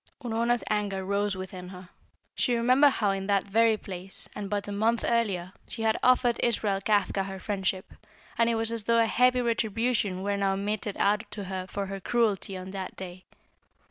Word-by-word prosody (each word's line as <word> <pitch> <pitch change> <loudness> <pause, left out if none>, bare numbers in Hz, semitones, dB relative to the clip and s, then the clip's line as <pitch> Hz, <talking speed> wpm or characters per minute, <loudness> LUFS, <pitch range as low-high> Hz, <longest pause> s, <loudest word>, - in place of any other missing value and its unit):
Unorna's 235 0 0
anger 200 -3 -1
rose 200 0 0
within 185 -1 -7
her. 185 -1 -11 0.4
She 245 - +1
remembered 255 +5 +5
how 205 -3 +1
in 195 0 -3
that 200 -1 +2
very 220 +2 +3
place, 190 -2 -7
and 200 -1 -5
but 205 0 -2
a - - -4
month 220 +3 +1
earlier, 195 -6 0
she 225 - -5
had 220 0 +3
offered 250 -1 +3
Israel 210 -4 +1
Kafka 205 -1 +1
her 195 0 -6
friendship, 190 -1 -2 0.4
and 230 0 +3
it 230 - +1
was 225 0 0
as 230 -3 -2
though 230 0 +3
a 230 - +5
heavy 250 +2 +3
retribution 225 -4 0
were 200 0 0
now 195 -1 +1
meted 205 +1 -3
out 210 +2 +1
to 205 - -6
her 185 -1 -5
for 200 +1 -3
her 195 0 -5
cruelty 205 -3 0
on 185 +1 -7
that 190 -1 -6
day. 185 -1 -9
205 Hz, 190 wpm, -28 LUFS, 195-230 Hz, 0.4 s, remembered